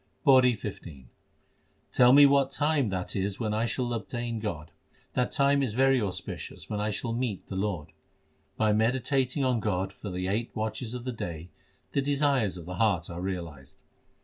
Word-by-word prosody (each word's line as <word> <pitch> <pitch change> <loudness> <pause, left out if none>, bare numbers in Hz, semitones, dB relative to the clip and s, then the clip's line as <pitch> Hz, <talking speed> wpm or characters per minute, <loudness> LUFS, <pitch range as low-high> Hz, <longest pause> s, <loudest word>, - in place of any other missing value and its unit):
PAURI 130 -3 +6
XV 85 -10 -8 0.9
Tell 125 0 +6
me 145 +2 +9
what 140 -1 +4
time 145 -4 +1
that 95 -1 -3
is 95 0 -2
when 110 -3 -1
I 110 +2 0
shall 120 +1 -1
obtain 120 0 -3
God: 85 -8 -5 0.4
That 125 -1 0
time 140 0 +3
is 120 -6 -1
very 135 0 +4
auspicious 95 -4 -5
when 105 - -1
I 105 - 0
shall 115 +3 -3
meet 115 -5 -3
the 95 - -5
Lord. 95 -6 -2 0.7
By 110 -1 +3
meditating 130 +4 +1
on 125 -2 +2
God 95 -3 -1
for 100 +2 -8
the 90 0 -3
eight 110 +5 -1
watches 110 +2 -3
of 125 - -6
the 130 - -2
day, 85 -5 -6 0.4
the 140 - +1
desires 140 -8 +1
of 85 - -9
the 90 +1 -6
heart 100 -7 +1
are 85 +1 -5
realised. 85 -8 -6
110 Hz, 175 wpm, -28 LUFS, 95-130 Hz, 0.9 s, me